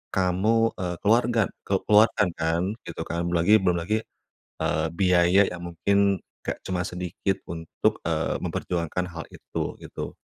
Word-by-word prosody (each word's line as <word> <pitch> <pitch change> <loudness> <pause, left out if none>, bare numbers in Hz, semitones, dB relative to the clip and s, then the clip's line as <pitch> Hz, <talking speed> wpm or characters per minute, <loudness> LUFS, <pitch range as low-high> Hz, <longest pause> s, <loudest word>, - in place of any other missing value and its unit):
kamu, 100 +5 +2
eee, 90 -1 -2
keluarga 115 +2 +3 0.3
ke - - -1
keluarkan 105 -2 +5
kan, 80 +1 +1 0.3
gitu - - -6
kan. 85 +1 -3
Belum 85 - -1
lagi 105 +5 +5
belum 90 -3 +1
lagi, 105 +6 0 0.6
eee, 80 - +1
biaya 90 +1 +4
yang 90 - -7
mungkin 100 +3 +2 0.2
enggak - - -3
cuma 90 -1 -1
sedikit 90 +2 -3
untuk, 80 -1 -2
eee, - - 0
memperjuangkan 90 +1 -2
hal 85 -2 -7
itu, - - -5
gitu. - - -6
90 Hz, 145 wpm, -25 LUFS, 85-100 Hz, 0.6 s, keluarkan